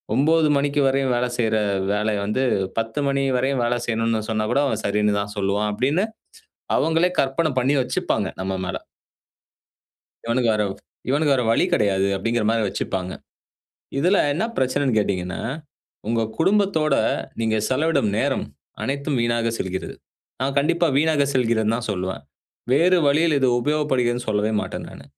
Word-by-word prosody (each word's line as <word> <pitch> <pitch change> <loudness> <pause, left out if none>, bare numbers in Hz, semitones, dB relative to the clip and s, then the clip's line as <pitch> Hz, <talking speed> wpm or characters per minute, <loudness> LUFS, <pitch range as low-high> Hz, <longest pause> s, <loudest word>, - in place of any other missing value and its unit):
9:00 155 +2 +3
மணிக்கு 145 +1 +1
வரையும் 135 -1 +1
வேலை 125 +1 0
செய்யிற 110 -2 +1 0.4
வேலைய 105 0 0
வந்து, 105 +6 0 0.4
10:00 115 +4 -3
மணி 140 0 0
வரையும் 130 0 0
வேலை 120 +1 0
செய்யணுன்னு 115 -1 0
சொன்னா 110 -1 0
கூட 140 - +3
அவன் 110 -4 -2
சரின்னு 105 0 +1
தான் 105 0 -6
சொல்லுவான்." 100 +2 0
அப்படின்னு, 145 - +1 0.7
அவுங்களே 165 +2 +2
கற்பனை 140 +4 +1
பண்ணி 130 +3 +2
வச்சுப்பாங்க 125 - -1
நம்ம 95 0 -2
மேல. 90 0 -3 1.5
"இவனுக்கு 115 -1 +2
வேற 105 0 +1 0.5
இவனுக்கு 145 +1 +3
வேற 125 - 0
வழி - - +3
கெடையாது." 100 -2 +2
அப்படீங்கற 115 +3 -1
மாரி 115 -1 +1
வச்சுப்பாங்க. 95 -1 -3 0.9
இதுல 180 +8 +3 0.2
என்ன 170 - 0
பிரச்சனைன்னு 130 -1 +1
கேட்டீங்கன்னா, 90 -3 -2 0.7
உங்க 115 0 +1 0.2
குடும்பத்தோட 190 -6 +2 0.5
நீங்க 110 -1 +1
செலவிடும் 140 -4 +1
நேரம் - - 0 0.4
அனைத்தும் 140 0 -1
வீணாக 115 0 +1
செல்கிறது. 95 0 -4 0.5
நா - - 0
கண்டிப்பா 170 +4 +2
வீணாக 150 -1 +3
செல்கிறதுன்னு 115 -3 +1
தான் 120 -1 -5
சொல்லுவேன். 95 -4 -4 0.5
வேறு 175 +7 +4
வழியில் 155 +3 +3
இது 135 -1 +2
உபயோகப்படுகிறதுன்னு 125 -4 0
சொல்லவே 105 +1 +1
மாட்டேன் - - -6
நானு. 70 - -12
125 Hz, 140 wpm, -22 LUFS, 110-145 Hz, 1.5 s, வேறு